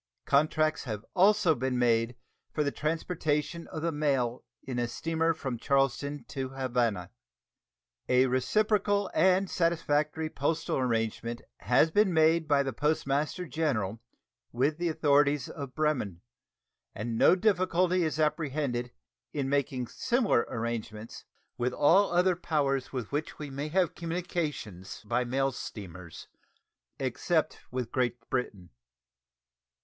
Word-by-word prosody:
Contracts 155 +2 +2
have 110 -3 -5
also 195 -2 +5
been 130 -2 -1
made 115 0 +2 0.4
for 150 - 0
the 140 - 0
transportation 155 +1 -2
of 155 - -6
the 170 - +1
mail 135 -5 0 0.2
in 125 -2 -3
a 120 - 0
steamer 165 +5 0
from 135 -7 -4
Charleston 140 +1 0
to 135 -2 -4
Havana. 120 -8 -1 1.0
A 125 +1 +5
reciprocal 205 - +1
and 185 +3 +4
satisfactory 160 -3 0
postal 155 +2 -1
arrangement 115 -1 -1
has 125 - +3
been 205 +1 +3
made 160 0 +4
by 145 -2 +3
the 135 -1 -3
Postmaster 150 +5 0
General 115 - -1 0.5
with 140 +6 0
the 175 -1 0
authorities 145 -2 +3
of 140 -4 -7
Bremen, 130 - -1 0.7
and 115 +2 -3
no 145 - +6
difficulty 185 -2 +2
is 155 -1 -1
apprehended 145 -5 -1 0.4
in 140 -3 -1
making 135 -3 0
similar 240 - +1
arrangements 115 -1 -5 0.3
with 125 +1 0
all 185 +10 +4
other 180 +1 +3
powers 140 -6 -1
with 125 -5 -5
which 150 +2 -3
we 150 -2 -7
may 140 +2 -4
have 180 +2 +1
communications 160 - -4
by 125 +4 +1
mail 135 +2 0
steamers, 90 -8 -8 0.7
except - - 0
with 125 -2 -4
Great 125 -2 0
Britain. 100 -8 -3
145 Hz, 125 wpm, -29 LUFS, 125-165 Hz, 1.0 s, no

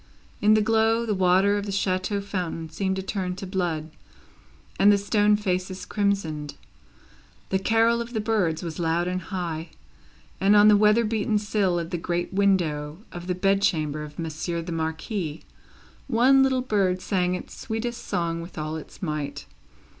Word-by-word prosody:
In 215 +1 +5
the 215 - +3
glow, 225 +1 +2
the 215 - 0
water 190 +2 +3
of 205 - -5
the - - -3
chateau 195 +1 0
fountain 175 -5 -4
seemed 190 +3 -1
to 190 - -4
turn 185 -2 -3
to 195 - -7
blood, 175 -5 -2 0.9
and 205 +1 +7
the 205 - +5
stone 205 +1 +3
faces 185 -2 -2
crimsoned. 180 -9 -1 0.9
The 190 - +1
carol 225 +3 +3
of 235 +1 -7
the 220 - -1
birds 205 -8 0
was 165 0 -5
loud 170 +1 +1
and 185 0 -2
high, 165 -3 -4 0.7
and, 200 +2 +4
on 210 +1 +7
the 210 - +7
weather 210 +3 +4
beaten 215 0 0
sill 205 -3 0
of 170 0 -4
the 175 - -2
great 175 +2 -2
window 165 -7 +1
of 175 0 -8
the 180 - 0
bed 195 +2 +2
chamber 155 -5 0
of 150 0 -9
Monsieur 165 +1 -3
the 170 - -6
Marquis, 160 +1 -3 0.6
one 265 +2 +5
little 265 -1 +3
bird 195 -6 +1
sang 180 -1 0
its - - -8
sweetest 235 +1 -4
song 170 -1 -2
with 170 +2 -10
all 155 +1 -3
its 160 - -11
might. 145 -3 -3
190 Hz, 170 wpm, -25 LUFS, 165-210 Hz, 0.9 s, and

